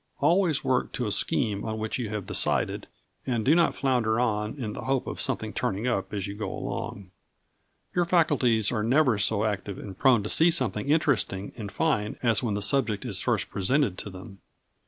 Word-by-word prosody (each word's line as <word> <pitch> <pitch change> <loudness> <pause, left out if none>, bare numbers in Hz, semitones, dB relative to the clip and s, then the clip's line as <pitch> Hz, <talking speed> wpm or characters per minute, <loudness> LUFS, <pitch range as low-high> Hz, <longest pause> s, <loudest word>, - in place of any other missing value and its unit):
Always 165 0 +2
work 130 -2 0
to 125 - -2
a 105 - -2
scheme 105 -1 +1
on 110 -1 -4
which 110 +3 -3
you 115 -4 -3
have 105 -2 -4
decided, - - +1 0.4
and 120 -4 -1
do 145 - +5
not 170 0 +3
flounder 120 -4 +1
on 110 0 -1
in 110 -6 -4
the - - -7
hope 135 -1 0
of - - -5
something 110 0 -2
turning 115 -1 -2
up 110 -6 -1
as 100 -3 -3
you 100 - -5
go 100 -2 -5
along. 95 -2 -6 0.8
Your 175 -1 +1
faculties 135 - +2
are 115 -3 -1
never 125 -1 +2
so 105 +1 +2
active 100 -2 -3
and 95 -2 -8
prone 125 -4 +3
to - - -4
see 165 +2 +5
something 130 -6 0
interesting 130 - +1
and 105 -4 -7
fine 135 -10 -1
as 115 -4 +3
when 110 -5 -1
the 100 - 0
subject 110 -1 +2
is 100 -6 -1
first 115 -6 -1
presented 105 +1 +1
to - - -6
them. 95 +1 -11
110 Hz, 200 wpm, -26 LUFS, 105-135 Hz, 0.8 s, do